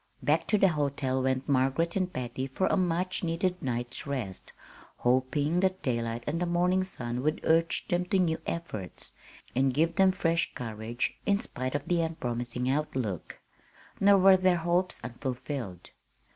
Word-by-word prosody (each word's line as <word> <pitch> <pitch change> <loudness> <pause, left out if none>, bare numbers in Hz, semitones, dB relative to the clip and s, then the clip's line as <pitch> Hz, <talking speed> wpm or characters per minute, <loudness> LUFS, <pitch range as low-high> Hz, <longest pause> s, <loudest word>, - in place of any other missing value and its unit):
Back - - +2
to 210 - +3
the 195 -1 +5
hotel 140 -4 0
went 130 0 0
Margaret 140 +5 +1
and 185 -2 0
Patty 130 -1 -4
for 135 +8 -1
a - - +2
much 180 0 0
needed 180 +2 -1
night's 120 0 -3
rest, 125 -10 -4 0.5
hoping 130 +6 +1
that 190 0 0
daylight 115 -2 -1
and 165 +4 -2
the 180 - +1
morning 180 +2 +2
sun 125 -9 -4
would 155 +3 0
urge 165 +1 +2
them 175 +1 0
to 195 - +1
new 165 -3 +1
efforts, 110 - -5 0.4
and 130 0 +2
give 165 +3 +1
them 190 -1 +6
fresh 165 -2 0
courage, 115 0 -3
in 200 -1 +4
spite 130 -5 -4
of 145 - -3
the 175 -1 +2
unpromising 125 -6 -2
outlook. 130 - -2 0.6
Nor 200 0 +6
were 190 0 +7
their 185 -1 +3
hopes 175 +2 0
unfulfilled. 125 - -5
145 Hz, 160 wpm, -29 LUFS, 125-175 Hz, 0.6 s, were